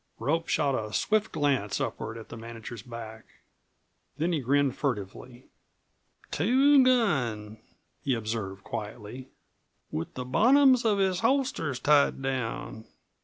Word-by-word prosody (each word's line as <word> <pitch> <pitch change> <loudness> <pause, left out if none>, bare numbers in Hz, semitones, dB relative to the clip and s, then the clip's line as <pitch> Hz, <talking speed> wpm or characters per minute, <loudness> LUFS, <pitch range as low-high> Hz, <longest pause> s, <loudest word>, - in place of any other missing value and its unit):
Rope 160 +8 -1
shot 145 -3 +1
a 110 -4 -3
swift 215 - +1
glance 140 -9 0
upward 110 +1 -4
at 115 - -11
the - - -8
manager's 115 -1 -8
back. 110 -1 -9 0.9
Then 165 +4 0
he 160 - +1
grinned 140 0 +1
furtively. 120 0 -4 0.9
"Two 265 - +4
gun," 125 - +1 0.4
he 135 -3 0
observed 110 -4 -4
quietly; 110 +4 -7 0.6
"with 80 - -5
the 125 - -5
bottoms 255 - +5
of 210 -2 +3
his 190 -2 +1
holsters 230 - 0
tied 145 +1 +3
down. 125 -4 -4
130 Hz, 120 wpm, -28 LUFS, 115-180 Hz, 0.9 s, bottoms